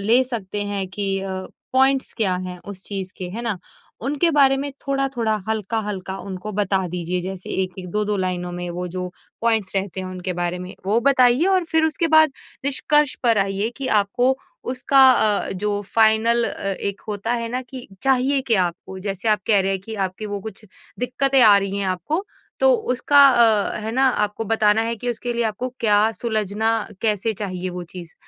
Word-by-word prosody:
ले 235 +5 +5
सकते 210 -5 -4
हैं 200 -2 -2
कि 195 0 -2
अ, 195 0 -4 0.4
पॉइंट्स 265 +1 +3
क्या 200 -5 +1
हैं 180 0 -7
उस 195 -2 -8
चीज 190 -2 -5
के? 185 - -5
है 225 +5 -5
ना? 230 -4 -1 0.5
उनके 290 +6 +1
बारे 275 -3 +5
में 280 +1 -3 0.2
थोड़ा-थोड़ा, 270 -5 0
हल्का-हल्का 210 -3 -2
उनको 195 +2 -6
बता 195 -2 +1
दीजिए। 180 +1 -2
जैसे 185 +1 -6
1-1, 185 0 -6
2-2 210 +1 0
लाइनों 180 -2 -2
में 175 0 -4
वो 180 +1 -4
जो 180 +1 -4 0.3
पॉइंट्स 225 -4 +1
रहते 190 -1 -2
हैं 185 - -5
उनके 185 0 -4
बारे 175 +1 -1
में 180 +1 -8
वो 215 +3 +3
बताइए 255 +2 +4
और 380 -2 +3
फिर 320 -1 +1
उसके 320 +1 0
बाद 315 -1 +7 0.3
निष्कर्ष 290 +1 +1
पर 230 -3 +3
आइए 195 +2 0
कि 275 -1 -4
आपको 245 +6 +1 0.3
उसका 260 +2 +1
अ, 215 -4 +2
जो 205 +2 -2
फ़ाइनल 225 +1 +4
अ, - - -5 0.2
एक 200 0 -3
होता 210 +2 -2
है 230 -1 -2
ना, 250 +2 -3
कि 255 0 -10 0.2
चाहिए 270 +1 +2
क्या 215 -6 +3
आपको। 180 +2 -6
जैसे 195 +2 -3
आप 215 -1 +3
कह 205 -3 +4
रहे 195 - 0
हैं 190 - -2
कि 225 - -6
आपकी 195 +1 -3
वो 205 -1 -4
कुछ 220 +1 -9 0.3
दिक्कतें 265 +2 +1
आ 210 -3 +8
रही 195 0 -3
हैं 195 - -1
आपको 240 - -2 0.4
तो - - +6 0.2
उसका 285 +2 +6
अ, 225 -5 +3
है 220 +1 -4
ना, 265 +2 +4
आपको 210 -2 -1
बताना 215 0 +3
है 230 +1 -2
कि 245 +3 -3
उसके 240 +1 -3
लिए 235 0 0
आपको 220 +3 -2
क्या 215 0 +4
सुलझना 220 -1 -1 0.3
कैसे 220 0 +1
चाहिए 185 -2 -4
वो 180 0 -6
चीज़? 175 -2 -9
215 Hz, 190 wpm, -22 LUFS, 190-245 Hz, 0.5 s, आ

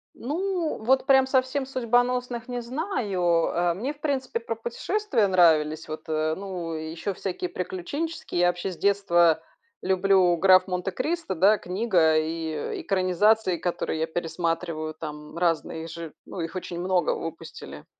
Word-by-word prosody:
Ну, 340 +5 -2
вот 260 +4 +3
прям 265 -1 +5
совсем 260 +1 +1
судьбоносных 245 -1 0
не 245 -1 -3
знаю. 245 - -2 0.3
Э, 175 0 +1
мне 255 +10 -3
в 295 - -25
принципе 270 -5 -1
про 230 0 -4
путешествия 235 - 0
нравились, 160 -4 +3
вот, 155 0 -6
э, 155 0 0
ну 185 -4 -5
еще 160 +5 -4
всякие 180 -1 -4
приключенческие. 190 - -3
Я 175 - +5
вообще 175 +2 -1
с 175 - -9
детства 175 -5 +3 0.4
люблю 190 -2 +3
"Граф 185 +1 +6
Монте-Кристо", 195 - -2
да, 200 +6 +5
книга 180 -4 +2
и 160 -1 -2
экранизации, 190 +1 +2
которые 170 -2 -2
я 160 - +1
пересматриваю, 165 -1 -2
там 150 0 -8
разные 165 -1 -1
же. 165 -1 -8
Ну - - -8
их 165 +2 -5
очень 175 -1 -5
много 180 -1 +1
выпустили. 75 - -8
185 Hz, 140 wpm, -26 LUFS, 165-245 Hz, 0.4 s, Граф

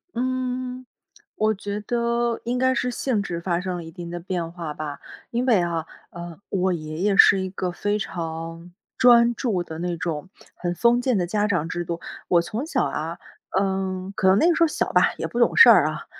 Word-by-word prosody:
嗯。 255 0 -3 0.5
我 215 0 +2
觉 205 0 -5
得 235 +1 0
应 245 +1 -1
该 260 +1 +3
是 250 -1 -1
性 245 -3 -1
质 175 -4 -4
发 170 -1 0
生 180 0 -3
了 175 - -5
一 165 - -10
定 175 -1 -8
的 175 0 -5
变 170 -2 -4
化 165 -4 -5
吧。 150 -1 -6 0.3
因 240 +2 -1
为 225 -8 +4
啊， 170 -2 -2 0.3
呃， 170 -1 -9
我 190 -1 0
爷 155 -2 -5
爷 200 0 +1
是 190 - +7
一 190 - -3
个 185 -1 -3
非 205 +3 -1
常， 165 -1 -6 0.3
专 240 -1 +6
注 215 -9 -1
的 160 -2 -7
那 175 0 -2
种， 165 +1 -4 0.3
很 175 -1 -3
封 235 +7 +3
建 250 -3 +1
的 175 -2 0
家 210 +3 0
长 175 -6 0
制 175 +1 -3
度。 170 0 -4 0.3
我 175 -1 +5
从 220 - -4
小 320 - 0
啊， - - -4 0.4
嗯， 190 -1 -2
可 190 - +3
能 190 +2 +5
那 330 - +4
个 345 - +4
时 - - +3
候 - - +5
小 305 - -2
吧， - - +4
也 - - -3
不 235 - -7
懂 235 - +3
事 460 - +10
儿 - - +7
啊。 - - -5
190 Hz, 230 characters per minute, -23 LUFS, 170-235 Hz, 0.5 s, 事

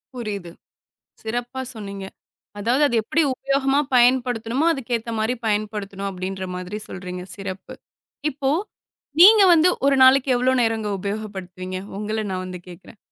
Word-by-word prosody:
புரியுது. 205 -7 -5 0.7
சிறப்பா 245 +3 -4
சொன்னீங்க. 200 -2 -7 0.5
அதாவது, 240 +7 +1
அத 240 - -3
எப்படி 315 +9 +1
உபயோகமா 275 +1 +1
பயன்படுத்தணுமோ, 245 +2 +2
அதுக்கு 255 -5 -4
ஏத்த 230 +1 -7
மாதிரி 220 +3 0
பயன்படுத்தணும் 205 -2 -2
அப்படிங்கிற 190 0 -5
மாதிரி 185 +3 -5
சொல்றீங்க. 180 -1 -7
சிறப்பு. 195 -1 -7 0.6
இப்போ, 270 -1 -1 0.7
நீங்க 425 +3 +9
வந்து 330 +1 +5 0.2
ஒரு 280 - +4
நாளைக்கு 265 +1 +5
எவ்வளவு 255 +1 +2
நேரம் 225 -2 0
உபயோகப்படுத்துவீங்க? 190 -3 -5 0.2
உங்கள 215 +1 -2
நான் 185 0 -3
வந்து 185 0 -6
கேக்குறேன். 180 +5 -13
220 Hz, 130 wpm, -22 LUFS, 195-255 Hz, 0.7 s, நீங்க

